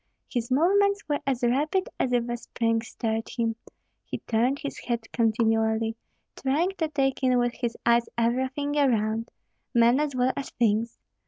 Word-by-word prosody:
His 240 -2 -3
movements 395 +8 +3
were 290 -1 0
as 255 -3 0
rapid 295 +10 +1
as 255 - +1
if 240 -1 +1
a 240 - -2
spring 230 -1 -1
stirred 225 0 -3
him; 230 -2 -1 0.5
he - - -5
turned 240 +5 +1
his 285 -1 -6
head 235 -2 -2
continually, 225 -1 +1 0.4
trying 300 +8 +1
to 320 - +1
take 275 -3 0
in 255 -1 +3
with 240 -1 +1
his 240 -2 -3
eyes 235 0 +3
everything 260 +5 0
around, 225 -4 +1 0.5
men 235 +3 +5
as 295 -3 -1
well 255 +1 +2
as 280 - -4
things. 230 0 0
245 Hz, 160 wpm, -26 LUFS, 230-275 Hz, 0.5 s, men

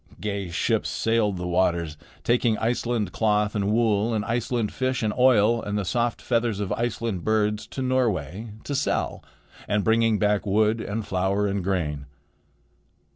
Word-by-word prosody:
Gay 100 -3 -3
ships 85 - 0
sailed 110 -4 +1
the 90 - -4
waters, 85 -3 +1 0.3
taking 120 -2 +2
Iceland 115 -3 -1
cloth 105 -1 +1
and 100 -1 0
wool 110 0 +2
and 105 - -1
Iceland 115 -1 -1
fish 130 -2 -1
and 105 -1 0
oil 120 -3 +4
and 105 0 -3
the 105 - -2
soft 120 +5 -1
feathers 115 -4 0
of 100 -2 -3
Iceland 115 -3 -2
birds 105 -1 0
to 130 - -5
Norway 110 - 0 0.2
to 145 - -4
sell, 140 +1 -1 0.4
and 105 0 +1
bringing 115 -1 +3
back 105 -1 +1
wood 110 +2 +2
and 105 +1 -4
flour 95 +2 0
and 100 -1 -1
grain. 75 -7 -2
105 Hz, 155 wpm, -25 LUFS, 100-115 Hz, 0.4 s, oil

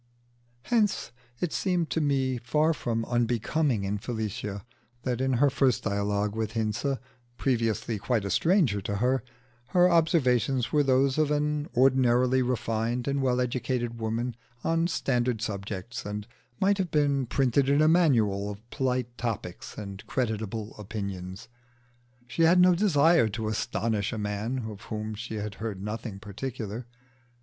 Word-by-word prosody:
Hence 215 - +1 0.3
it 175 - -1
seemed 180 -4 0
to 160 - +1
me 135 -3 +1
far 150 +7 +2
from 115 -6 -2
unbecoming 120 +1 +1
in 100 +1 -2
Felicia 105 -3 -4 0.4
that 125 -1 -1
in 130 0 +1
her 140 +3 +4
first 130 -2 +2
dialogue 100 0 0
with 110 -1 -2
Hinze, 115 +5 -1 0.4
previously 115 -3 0
quite 105 +1 0
a 100 - -2
stranger 160 - +3
to 100 +2 -3
her, 125 +5 +1 0.4
her 180 +4 +5
observations 135 - +2
were 150 - +4
those 135 +1 +3
of 155 -2 +3
an 150 0 0
ordinarily 130 0 +4
refined 120 0 -1
and 140 0 0
well 125 -1 +2
educated 120 -1 -1
woman 115 +2 -2 0.3
on 165 +1 +2
standard 125 -8 0
subjects, 100 +1 -4
and 105 0 -5 0.3
might 200 +1 +3
have 185 -2 0
been 140 -4 +1
printed 135 +2 +2
in 140 +1 +4
a 155 - +5
manual 115 - +3
of 105 +3 -9
polite 125 -2 -1
topics 110 -7 -4
and 100 -2 -7
creditable 110 -4 -2
opinions. 100 -3 -6 0.8
She 125 +7 -3
had 170 +2 +6
no 180 0 +7
desire 165 - +4
to 110 +2 -3
astonish 110 -1 -1
a 115 - -4
man 105 +4 -2
of 105 -1 -8
whom 110 0 -4
she 110 +1 -6
had 105 -1 -4
heard 110 -4 -3
nothing 105 -1 -5
particular. 110 +2 -5
120 Hz, 145 wpm, -28 LUFS, 105-140 Hz, 0.8 s, no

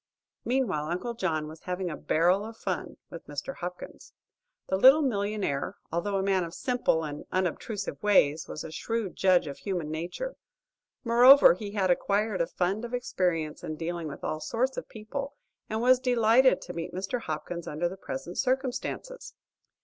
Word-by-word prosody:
Meantime, 205 - 0
Uncle 180 +8 -2
John 155 -10 -1
was 155 +1 -11
having 180 0 -2
a - - -4
"barrel 175 +7 +2
of 225 +1 -8
fun" - - -4
with - - -10
Mr. - - -5
Hopkins. - - -8 0.5
The 190 - 0
little 265 +10 +7
millionaire, 205 - -1 0.2
although 170 +5 -1
a 190 - 0
man 190 -2 +2
of 170 0 -7
simple 245 -10 +1
and 150 -1 -5
unobtrusive 190 +3 -2
ways, 160 -7 +3
was 155 - -6
a 160 - -7
shrewd 225 +4 -3
judge 185 -3 +4
of 140 -2 -7
human 175 -6 -3
nature. 175 - -4 0.7
Moreover 245 0 +8
he 200 +3 -7
had 190 -3 +2
acquired 200 +1 +1
a 170 - +1
fund 190 +5 -1
of 240 +1 -3
experience 175 -10 -1
in 155 - -4
dealing 165 +1 -4
with 140 - -8
all 155 - -2
sorts 245 +11 -1
of - - -6
people, 275 +6 -6 0.3
and 220 +1 -1
was 255 0 +6
delighted 250 0 +4
to 180 - -7
meet 170 +1 -5
Mr. 195 +6 -2
Hopkins 160 +1 -5
under 155 +4 -1
the 180 - -6
present 170 -1 -6
circumstances. 265 - -2
195 Hz, 170 wpm, -28 LUFS, 165-235 Hz, 0.7 s, Moreover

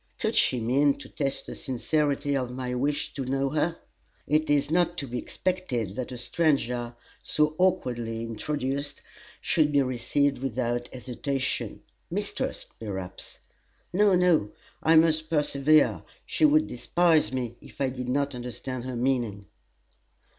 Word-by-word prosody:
Could - - 0
she 125 - +3
mean 140 +5 +3
to - - -11
test 135 -2 -2
the - - -7
sincerity 145 +2 0
of 130 -2 -1
my 125 0 -4
wish 140 +4 -1
to 135 - -3
know 135 +1 0
her. 160 +2 0 0.5
It 155 +1 +1
is 145 0 +2
not 175 0 +2
to 140 - -3
be 125 0 -3
expected 125 - -2
that 130 +1 -4
a 125 - -5
stranger, 120 -2 0 0.3
so 150 0 +2
awkwardly 120 -11 0
introduced, 135 +5 -3 0.4
should 150 -2 +2
be 140 -1 +4
received 135 +2 0
without 120 -2 -1
hesitation 130 +1 -3 0.3
mistrust, - - -3
perhaps. 95 -4 -6 0.6
No, 200 0 +5
no, 175 - +3 0.3
I 160 +1 +4
must 160 -1 +4
persevere; 150 -1 +3 0.2
she - - +2
would 305 +1 +5
despise 165 +4 +2
me 125 -3 -2
if - - -15
I 135 -2 +2
did 125 -1 -5
not 140 +2 0
understand 125 0 -5
her 130 -1 -4
meaning." 120 -5 0
135 Hz, 140 wpm, -27 LUFS, 125-150 Hz, 0.6 s, No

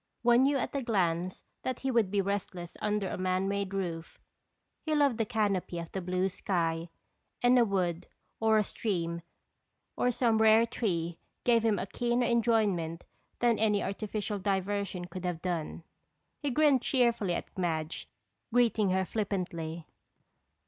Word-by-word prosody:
One 240 +1 +6
knew 275 +1 +3
at 265 - -3
a 280 - 0
glance 185 -6 0 0.2
that 255 -1 -3
he 270 - 0
would 230 -5 +3
be 200 0 +1
restless 190 -3 -4
under 210 -2 0
a - - -4
man 185 +1 0
made 200 -1 -1
roof. 170 -4 -4 0.6
He 310 -1 -1
loved 280 -6 +3
the 225 - +1
canopy 205 -6 0
of 170 -1 -6
the 190 - -3
blue 185 +1 0
sky, 170 -3 -1 0.5
and 245 +1 +6
a - - +6
wood 180 -4 -1 0.3
or 220 -1 +4
a 215 - +4
stream 170 -6 -2 0.7
or 250 - +2
some 230 -2 +2
rare 220 +1 +6
tree 175 -8 -2 0.2
gave 235 -2 +4
him 220 -3 +3
a - - -2
keener 240 +4 0
enjoyment 215 -9 +1 0.3
than 240 -2 +2
any 210 -2 +2
artificial 210 +1 -3
diversion 195 -1 -1
could 180 +1 -8
have 180 -2 -2
done. 170 -2 -3 0.6
He 290 - -1
grinned 280 -1 +4
cheerfully 235 -9 +2
at - - -6
Madge, 165 -3 -2 0.4
greeting 225 -4 +3
her 190 +1 +1
flippantly. 175 -6 -3
200 Hz, 155 wpm, -30 LUFS, 180-230 Hz, 0.7 s, One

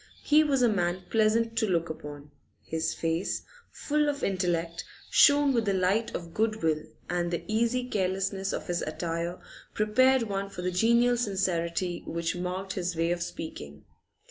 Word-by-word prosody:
He 305 +1 +5
was 275 -4 +2
a - - +6
man 180 -3 0
pleasant 225 +1 +2
to 220 - +1
look 170 -2 +1
upon; 145 -2 -8 0.3
his 160 0 -2
face, 165 +2 -1 0.3
full 300 0 0
of 285 0 -3
intellect, 175 -3 -1 0.3
shone 285 -1 +6
with 230 -2 +1
the 200 -1 +1
light 190 +5 +1
of 170 -1 -6
good 220 -3 0
will, 155 -1 +2 0.3
and 175 0 -1
the 170 - -3
easy 235 +3 0
carelessness 195 -1 -1
of - - -4
his 175 -1 -1
attire 170 +2 -3 0.4
prepared 255 +4 +4
one 200 -2 -3
for 180 -2 -7
the 180 - 0
genial 235 +6 +3
sincerity 185 -5 -1
which 170 +1 -2
marked 185 +2 -3
his 180 -2 -2
way 165 +1 +1
of 175 0 -1
speaking. 75 - -7
185 Hz, 165 wpm, -28 LUFS, 170-225 Hz, 0.4 s, a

